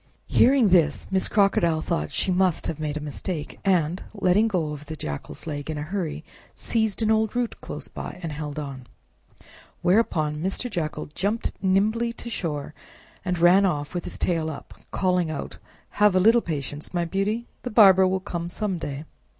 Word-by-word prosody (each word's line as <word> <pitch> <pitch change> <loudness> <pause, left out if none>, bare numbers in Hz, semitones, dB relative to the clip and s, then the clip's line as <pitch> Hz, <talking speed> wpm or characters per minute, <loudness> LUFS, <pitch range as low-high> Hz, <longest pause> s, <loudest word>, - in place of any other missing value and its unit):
Hearing 255 -4 +5
this, 165 -5 +3
Miss 190 -1 +2
Crocodile 175 -6 +2
thought 75 0 -2
she 190 - 0
must 185 -2 +2
have 160 - -3
made 150 -1 -2
a - - -3
mistake, 150 +2 -5
and, 180 -2 +2
letting 200 +2 +3
go 165 -8 -1
the 150 +2 -8
Jackal's 75 - -6
leg 145 -2 -5
in 155 - -3
a 145 - -3
hurry, 165 -2 -3 0.3
seized 220 -1 0
an 220 - +3
old 220 +1 +1
root 245 -1 -2
close - - -7
by, - - -7
and 165 - -3
held 150 0 -5
on. 135 -4 -6 1.0
Whereupon 170 -6 +2
Mr. 190 +9 -3
Jackal 165 -5 -3
jumped 205 +7 -1
nimbly 215 +5 +2
to 235 0 -8
shore, 150 -7 -3 0.5
and 180 -1 -1
ran 175 +4 +6
off 150 -6 -1
with 175 -2 -3
his - - -4
tail 165 -3 0
up, 150 - -8 0.2
calling 180 -3 +1
out, 155 - -5 0.4
"Have 210 -2 +5
a - - +5
little 225 +5 +5
patience, 150 -1 -5
my 175 -1 +1
beauty! 200 +6 -1 0.2
The 250 - -4
barber 190 -4 +7
will 190 0 0
come 170 -3 -4
some 190 -1 -2
day!" 145 -1 -5
180 Hz, 175 wpm, -25 LUFS, 155-200 Hz, 1.0 s, barber